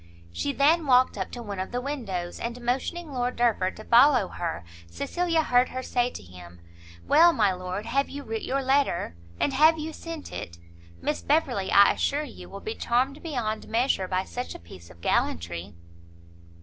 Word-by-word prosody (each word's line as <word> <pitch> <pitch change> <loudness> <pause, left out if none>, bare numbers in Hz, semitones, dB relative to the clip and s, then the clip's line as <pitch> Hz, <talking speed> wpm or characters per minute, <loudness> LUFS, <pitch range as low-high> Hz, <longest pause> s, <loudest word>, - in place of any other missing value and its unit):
She 280 - -1
then 295 +4 +3
walked 255 0 +4
up 190 -2 -4
to 240 - -7
one 200 -3 -6
of 190 - -4
the 245 - -1
windows, 220 -11 -4
and 235 +1 -4
motioning 270 +7 -2
Lord 250 -1 -1
Derford 220 -6 +1
to 215 - -9
follow 245 -3 +5
her, 165 - -4 0.2
Cecilia 330 - -1
heard 250 -2 +3
her 255 +1 -5
say 245 -1 0
to - - -10
him, 90 -1 -13 0.5
"Well, 340 +2 +7
my 210 -7 +3
lord, 185 +3 -5
have 275 +4 0
you 285 +1 -7
writ 225 -2 -4
your 270 +1 -1
letter? 265 - +1 0.2
and 280 - +1
have 310 +4 +5
you 315 +1 -5
sent 330 -2 -8
it? 85 - -7 0.5
Miss 295 - -1
Beverley, 265 -10 +1
I 200 0 +7
assure 290 +2 0
you, - - -10
will - - -9
be 440 - -4
charmed 265 - 0
beyond 240 -9 -3
measure 230 -5 +1
by 185 0 0
such 245 +5 -6
a - - -8
piece 85 0 -14
of 85 - -17
gallantry." 85 +4 -1
245 Hz, 185 wpm, -26 LUFS, 190-280 Hz, 0.5 s, Well